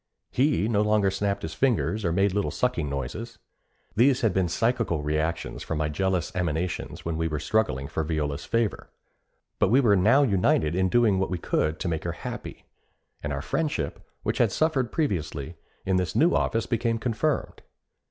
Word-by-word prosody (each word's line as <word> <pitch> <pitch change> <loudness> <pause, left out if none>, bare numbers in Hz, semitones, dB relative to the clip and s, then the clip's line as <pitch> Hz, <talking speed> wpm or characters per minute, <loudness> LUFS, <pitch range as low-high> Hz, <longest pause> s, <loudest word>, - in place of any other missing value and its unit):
He 135 -4 +2
no 105 -3 +2
longer 105 -2 +3
snapped 100 +1 -1
his 80 - -4
fingers 110 -3 +1
or 85 - +1
made 95 +2 +2
little 100 0 0
sucking 125 - -1
noises. 70 - -5 0.6
These 130 +4 +4
had 110 -5 +2
been 95 -1 +2
psychical 115 -4 0
reactions 75 +2 -2
from 80 - -3
my 75 0 0
jealous 95 +5 -1
emanations 90 0 -2
when 85 -1 -2
we 80 0 0
were 75 -1 -2
struggling 75 - 0
for 80 - -2
Viola's 75 -2 -2
favor; 115 -2 -1 0.7
but - - +3
we 125 +6 +5
were 110 -7 +4
now 110 +10 +5
united 95 - +2
in 95 +1 +1
doing 110 -3 +3
what 95 - 0
we 90 - -1
could 80 -2 -1
to - - -1
make 80 -2 -2
her 85 - -2
happy; - - -7 0.6
and 75 - -3
our 70 -1 -3
friendship, 155 -2 -2 0.2
which - - -1
had - - +4
suffered 140 -7 +1
previously, 80 - -2 0.3
in 95 -1 +2
this 90 -3 -1
new 170 +3 +4
office 115 0 +1
became 115 -1 0
confirmed. 125 +6 -1
95 Hz, 180 wpm, -26 LUFS, 80-115 Hz, 0.7 s, we